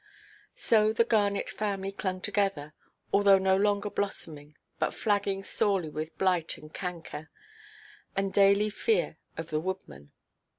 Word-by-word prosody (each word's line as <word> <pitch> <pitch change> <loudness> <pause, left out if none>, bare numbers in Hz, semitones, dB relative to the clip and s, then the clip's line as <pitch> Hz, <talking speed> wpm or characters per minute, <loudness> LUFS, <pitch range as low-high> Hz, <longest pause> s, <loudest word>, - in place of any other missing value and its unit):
So 215 -1 +3
the 230 - +4
Garnet 205 -3 +1
family 195 -2 -3
clung 185 -2 -3
together, 195 -8 -1 0.4
although 200 -1 +6
no 190 0 +3
longer 205 +1 +1
blossoming, 150 -7 -4 0.2
but - - 0
flagging 200 -2 0
sorely 195 -6 0
with 155 +1 -5
blight 180 -4 +1
and 155 0 -14
canker, 170 -4 -6 0.9
and 195 0 -1
daily 200 +1 +4
fear 440 - 0 0.2
of 165 0 -6
the 155 - +1
woodman. 115 - -6
195 Hz, 130 wpm, -29 LUFS, 165-205 Hz, 0.9 s, although